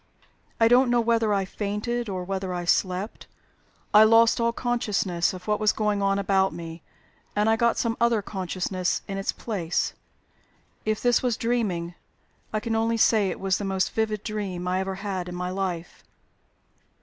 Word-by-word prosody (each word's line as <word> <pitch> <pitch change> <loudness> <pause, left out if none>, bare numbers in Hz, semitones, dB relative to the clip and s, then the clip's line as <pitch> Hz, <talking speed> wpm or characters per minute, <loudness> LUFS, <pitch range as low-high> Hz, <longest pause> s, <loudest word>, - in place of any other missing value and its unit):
I 225 - +6
don't 245 +2 +5
know 240 0 +3
whether 230 -2 +2
I 195 -1 +1
fainted 210 +4 -3
or 185 -2 -3
whether 190 0 -3
I 175 0 -3
slept; 185 +4 -1 0.7
I 210 +1 +9
lost 230 +1 +5
all 235 0 +2
consciousness 210 -8 0
of 185 +1 -10
what 210 0 +1
was 215 0 +4
going 210 -2 0
on 195 0 +2
about 195 -2 +2
me, 165 -1 -8 0.5
and 210 +1 +2
I 225 - +4
got 235 0 +2
some 230 -1 0
other 235 -3 +3
consciousness 185 -1 -2
in 195 0 -4
its 195 - -1
place. 180 -7 -2 0.9
If 215 0 0
this 245 -1 +3
was 245 -3 0
dreaming, 205 -8 -1 0.6
I 215 - 0
can 225 0 -2
only 225 +1 +1
say 215 -3 +4
it - - -5
was 190 -1 0
the - - -4
most 190 -1 0
vivid 215 -2 -1
dream 195 -5 -4
I 185 +1 +1
ever 190 0 -2
had 190 -2 -4
in 180 - -6
my 180 0 -3
life." 180 -3 -4
205 Hz, 175 wpm, -25 LUFS, 185-225 Hz, 0.9 s, I